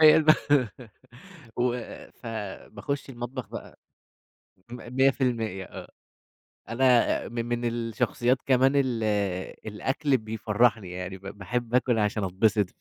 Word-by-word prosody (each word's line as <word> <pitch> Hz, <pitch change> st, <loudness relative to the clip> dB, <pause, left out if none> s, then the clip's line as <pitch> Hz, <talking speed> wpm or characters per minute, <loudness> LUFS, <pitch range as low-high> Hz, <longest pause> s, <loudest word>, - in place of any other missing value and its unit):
هي 155 Hz, 0 st, +8 dB, 1.3 s
و 125 Hz, 0 st, +2 dB, 0.5 s
فباخش 115 Hz, +6 st, -5 dB
المطبخ 120 Hz, -2 st, -6 dB
بقى، -, -, -9 dB, 0.9 s
100% 125 Hz, -5 st, 0 dB
آه، -, -, -9 dB, 0.8 s
أنا 125 Hz, 0 st, +3 dB
من 120 Hz, 0 st, -3 dB
من 120 Hz, 0 st, -2 dB
الشخصيات 120 Hz, +1 st, 0 dB
كمان 130 Hz, 0 st, +4 dB
ال 130 Hz, -5 st, +1 dB, 0.6 s
الأكل 130 Hz, +7 st, 0 dB
بيفرحني 110 Hz, -1 st, +1 dB
يعني 90 Hz, +1 st, -5 dB
ب -, -, -29 dB, 0.2 s
باحب 120 Hz, +5 st, -3 dB
آكل 125 Hz, -2 st, +3 dB
عشان 105 Hz, 0 st, +1 dB
أتبسط. 100 Hz, +2 st, +2 dB
120 Hz, 100 wpm, -27 LUFS, 110-130 Hz, 1.3 s, هي